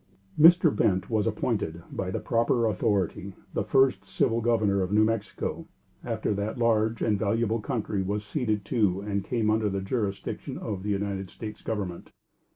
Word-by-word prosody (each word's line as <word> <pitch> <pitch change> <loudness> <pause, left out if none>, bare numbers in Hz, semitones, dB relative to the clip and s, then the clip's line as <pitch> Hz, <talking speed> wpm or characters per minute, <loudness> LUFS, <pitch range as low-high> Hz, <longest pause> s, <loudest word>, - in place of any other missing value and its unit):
Mr. 165 -3 +7
Bent 95 0 +1
was 110 -3 +1
appointed, - - -2
by - - -3
the - - -2
proper 115 +1 +1
authority, 100 -3 -1 0.2
the - - 0
first 135 -1 +3
Civil 115 0 0
Governor 110 -4 +2
of 90 0 -2
New 105 +1 +5
Mexico, 110 -1 -2 0.4
after - - -1
that 100 +3 -3
large 115 -1 +2
and 105 -3 +1
valuable 115 +2 +1
country 105 -4 -2
was 105 +2 -2
ceded 110 -6 -1
to 100 -5 +1
and 100 -1 -2
came 110 0 0
under 110 -1 +1
the 100 0 -2
jurisdiction 100 0 -3
of 100 -3 -4
the 105 - -4
United 100 -2 -2
States 105 -1 -8
Government. 100 -6 -4
105 Hz, 160 wpm, -27 LUFS, 100-115 Hz, 0.4 s, Mr